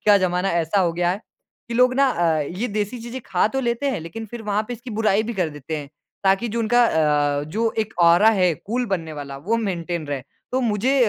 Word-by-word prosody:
का 205 -1 +7
ज़माना 180 +1 0
ऐसा 170 +3 +1
हो 170 -2 +2
गया 175 +1 +1
है 195 +3 -3 0.5
कि 235 - -4
लोग 250 +1 +4
ना 275 +1 +4
अ, 165 -8 +1
ये 180 +11 -3
देसी 210 +3 -2
चीज़ें 240 +2 -6
खा 185 0 +2
तो 270 +4 -2
लेते 240 +3 0
हैं, 255 - -3
लेकिन 220 +8 -7
फिर 230 +1 -8
वहाँ 210 0 0
पे - - -3
इसकी 240 +2 -10
बुराई 215 -1 +2
भी 235 +1 -4
कर 180 -4 0
देते 150 +1 -5
हैं। 145 -2 -6 0.4
ताकि 195 +5 +3
जो 230 +2 -3
उनका 240 +2 +4
अ, 145 -5 +2
जो 220 +9 -1
एक 220 0 -1
ऑरा 175 +6 +6
है 180 -6 +2
कूल 240 +8 -3
बनने 165 -6 -2
वाला, 140 -2 -7
वो 205 +11 0
मेंटेन 175 -6 -3
रहे। 140 -3 -3 0.3
तो 260 - +2
मुझे 240 +4 +1
200 Hz, 235 wpm, -22 LUFS, 170-230 Hz, 0.5 s, का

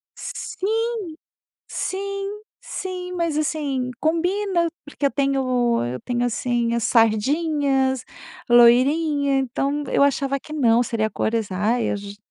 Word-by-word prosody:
Sim, 450 +4 -3 0.7
sim, 395 +1 -4 0.2
sim, 365 -1 -6
mas, 335 -4 -1
assim, 285 -4 -1
combina 345 +2 +1 0.2
porque 290 -1 -2
eu - - +2
tenho 255 - +1
eu 125 +1 -4
tenho, 245 0 -1
assim, 240 0 0
as 235 -2 0
sardinhas, 265 +3 +2 0.4
loirinha, 275 +4 +4
então 275 +3 -1
eu - - +2
achava 275 0 +1
que 305 - -12
não, 240 -6 +3
seria 230 -3 -1
cores 220 -2 -1
ai 220 +5 0
j 200 0 -8
275 Hz, 115 wpm, -22 LUFS, 240-325 Hz, 0.7 s, loirinha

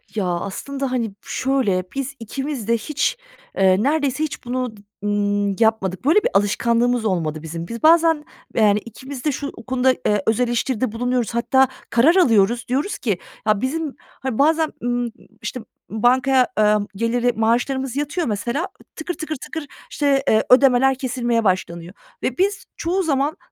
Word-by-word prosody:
Ya 200 -3 0
aslında, 250 +10 -3
hani, 230 -5 -1
şöyle, 255 -9 0
biz 275 +1 -3
ikimiz 270 +1 -5
de 230 - +3
hiç, 300 - -1 0.4
eee, 190 +2 +4
neredeyse 290 0 +1
hiç 295 -4 -5
bunu 250 -3 -3
d - - -16 0.2
ımm, 205 -1 0
yapmadık. 220 -1 +1
Böyle 330 +8 +5
bir - - +2
alışkanlığımız 235 +4 +2
olmadı 160 -6 -1
bizim. 165 +1 -6
Biz 230 +5 -7
bazen, 325 -1 +5 0.3
yani, 210 -2 +4
ikimiz 260 +5 -9
de 300 - +3
şu 280 +1 -4 0.2
konuda, 260 0 +3
eee, 210 -2 +2
öz 220 +2 +2
eleştiride 240 -1 0
bulunuyoruz. 245 0 -1
Hatta 265 +2 +3 0.2
karar 280 +10 +4
alıyoruz, 235 - +3
diyoruz 275 +11 -1
ki, 205 -7 -1 0.3
ya 210 -1 +3
bizim, 300 +2 -2
hani, 265 -2 -6
bazen, 315 +2 +3
ımm, 245 -1 -1 0.3
işte, 250 - -4
ımm, 220 0 -10
bankaya, 255 +1 +4
eee, 210 0 +5 0.2
geliri 240 +3 +1
maaşlarımız 245 +4 0
yatıyor 295 +2 -1
mesela, 240 - -2 0.3
tıkır 335 +3 -4
tıkır 315 -1 -5
tıkır, 305 +3 -6 0.3
işte, 280 -2 +1
eee, 220 - +4
ödemeler 265 0 +5
kesilmeye 240 -3 0
başlanıyor 180 -2 -1 0.3
ve 255 - -1
biz 395 +1 0
çoğu 365 +3 0
zaman 290 +2 0
245 Hz, 155 wpm, -21 LUFS, 215-275 Hz, 0.4 s, Böyle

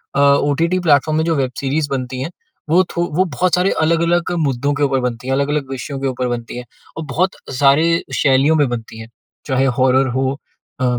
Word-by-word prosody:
अ, - - +1
OTT 145 +5 +2
platform 155 -2 +2
में 160 - +1
जो 165 -1 +1
web 135 -3 -1
series 145 +2 -1
बनती 130 -1 -3
हैं 150 - -3 0.4
वो 175 +4 +4
थो 175 - -1
वो 185 - +3
बहुत 180 +4 +2
सारे 180 +2 +1
अलग-अलग 170 +2 +1
मुद्दों 140 +1 0
के 145 0 -1
ऊपर 135 -2 +1
बनती 125 0 -4
हैं। 135 - 0
अलग-अलग 140 0 -1
विषयों 135 +1 -5
के 135 - -2
ऊपर 125 -1 -2
बनती 120 0 -5
हैं। 125 - -7 0.3
औ - - -3
बहुत 185 +6 +1 0.3
सारे 155 +5 +3
शैलियों 140 +3 +3
में 145 -3 +3
बनती 115 -2 -6
हैं। 110 - -9 0.4
चाहे 135 -1 +1
हॉरर 130 +1 +3
हो 135 0 0 0.5
अ, - - +2
140 Hz, 200 wpm, -18 LUFS, 130-160 Hz, 0.5 s, वो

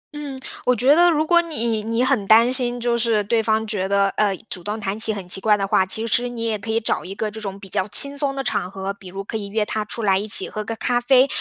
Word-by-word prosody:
嗯， 285 -3 -6 0.3
我 250 - +4
觉 255 +5 +4
得 350 +2 +5
如 310 -1 +1
果 345 +1 +4
你 235 -10 -2
你 230 +3 -1
很 250 -7 0
担 230 +4 +5
心， 245 -2 +1
就 235 0 0
是 230 -3 +1
对 225 +2 +1
方 220 0 0
觉 205 -3 -2
得， 200 0 +2
呃， 200 -3 0
主 180 - -6
动 210 +3 -4
谈 205 +1 -4
起 220 0 0
很 195 -4 -6
奇 190 +2 -3
怪 210 -1 +3
的 195 - -1
话， 190 -1 +2
其 220 +4 -1
实 245 +2 0
你 235 -1 -6
也 225 -2 0
可 220 - -8
以 225 +1 +1
找 220 - -2
一 190 +2 -7
个 215 0 -3
这 220 +1 -9
种 195 -1 -6
比 195 - -11
较 190 0 -2
轻 280 +7 +6
松 280 -1 -2
的 270 - -3
场 180 - -2
合， 195 +1 -5
比 195 -1 -14
如 195 +2 -7
可 220 - -5
以 200 -2 -6
约 210 +1 -1
他 215 0 -3
出 225 +2 -6
来 195 -2 +3
一 210 - -5
起 205 - -1
喝 215 - -5
个 225 +2 -5
咖 240 +3 0
啡， 260 +1 +4
220 Hz, 310 characters per minute, -21 LUFS, 200-245 Hz, 0.3 s, 轻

